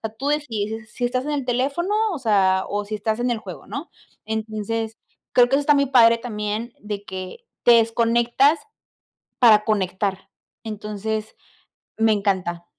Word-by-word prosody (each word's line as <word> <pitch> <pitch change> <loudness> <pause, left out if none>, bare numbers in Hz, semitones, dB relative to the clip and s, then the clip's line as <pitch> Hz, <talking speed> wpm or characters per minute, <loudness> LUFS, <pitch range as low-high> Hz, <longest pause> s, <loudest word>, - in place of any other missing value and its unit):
sea, 220 -1 -5
tú 270 +5 -3
decides, 225 -7 -2
si - - -20
si 245 - -1
estás 250 +2 -1
en 300 - -3
el 285 -3 -2
teléfono, 275 +10 -1 0.2
o 330 - -4
sea, 195 -6 +2
o 205 0 -2
si 215 +1 -4
estás 220 +2 -2
en 245 - 0
el 235 - 0
juego, - - -10
¿no? - - -6 0.4
Entonces, 220 +1 -3 0.3
creo 245 -1 +5
que 270 - +1
eso 290 - +2
está 290 +1 +4
muy 280 0 +3
padre 230 -3 +5
también, 220 0 -4
de 205 -1 -6
que 190 - -8 0.2
te 240 - +7
desconectas 235 +6 +3 0.8
para 220 -4 +6
conectar. 195 -2 -1 0.3
Entonces, 215 0 -4 0.6
me 225 0 +3
encanta. 185 -4 -1
220 Hz, 165 wpm, -22 LUFS, 210-245 Hz, 0.8 s, te